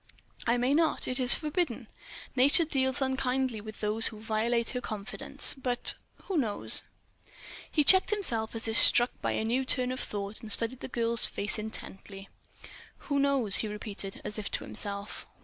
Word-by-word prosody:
"I 235 +1 +2
may 250 +3 0
not. 320 +1 +2
It 255 +1 +2
is 250 -1 +7
forbidden. 300 - -3 0.5
Nature 285 +6 +3
deals 265 -2 0
unkindly 260 -3 -2
with 215 0 -11
those 215 +1 +3
who 215 - -7
violate 225 +2 -1
her 250 - -4
confidence. 210 -3 +2
But—who 265 +7 -2
knows?" 215 -6 +1 0.9
He 300 - +2
checked 375 +6 +5
himself 235 - -2
as 225 - -2
if 225 - +2
struck 240 +1 +5
by - - -1
a 220 - -2
new 245 +4 0
turn 255 -1 +2
of 255 - -5
thought, 205 +1 -5
and 220 -2 -9
studied 230 +4 -1
the - - -7
girl's 235 -2 +1
face 205 +2 -3
intently. 195 -2 -8 0.7
"Who 285 -1 -3
knows?" 270 -8 +5
he 220 - -2
repeated, 210 -2 -7
as 210 - -4
if 205 - -5
to - - -1
himself. 200 0 -5
235 Hz, 165 wpm, -28 LUFS, 215-265 Hz, 0.9 s, is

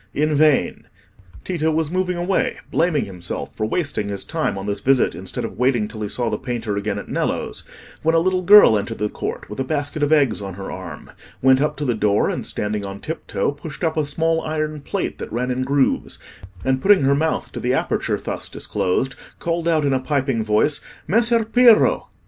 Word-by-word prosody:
In 155 +1 +1
vain! 150 -1 +2 0.6
Tito 165 -4 -1
was 160 -1 0
moving 180 -1 -1
away, 180 +2 0
blaming 165 -4 +1
himself 90 -3 -6
for 110 - -1
wasting 110 - -1
his 100 -1 -4
time - - -2
on 95 - -5
this 100 -1 -2
visit, 130 +4 +2
instead - - -5
of - - -8
waiting 125 -4 +2
till 110 0 -9
he 105 - -2
saw 120 +3 -2
the - - -2
painter 120 -5 -3
again 100 0 -2
at 100 - -7
Nello's, - - -2 0.4
when 160 +1 +2
a - - +5
little 185 +2 +1
girl 185 - +8
entered 115 +3 -5
the 105 - -1
court - - -5
with 105 - -8
a - - +1
basket 145 +2 -2
of 145 +1 +1
eggs 140 -9 +3
on 95 -2 -6
her 95 0 -7
arm, - - -8 0.3
went 130 0 +5
up 150 - 0
to 150 - -3
the 125 - +1
door, 105 -2 +1
and - - -4
standing 105 0 -2
on 100 0 -6
tiptoe, 160 0 -3
pushed 145 +4 -9
up 160 -1 +1
a 155 - +1
small 165 +3 0
iron 155 -1 -3
plate - - -3
that - - -6
ran 125 +2 -1
in 125 +1 -1
grooves, 135 +1 0 0.5
and 130 0 +1
putting 200 -6 +5
her 135 +1 +4
mouth 160 +3 -1
to - - -6
the 125 +2 0
aperture - - -1
thus - - -5
disclosed, 130 +9 -1 0.2
called 170 0 -2
out 160 -3 +2
in 140 - +2
a 130 - +2
piping 135 -4 0
voice, 110 +7 +2 0.3
"Messer 230 +2 +3
Piero!" 235 0 +5
140 Hz, 205 wpm, -21 LUFS, 110-160 Hz, 0.6 s, girl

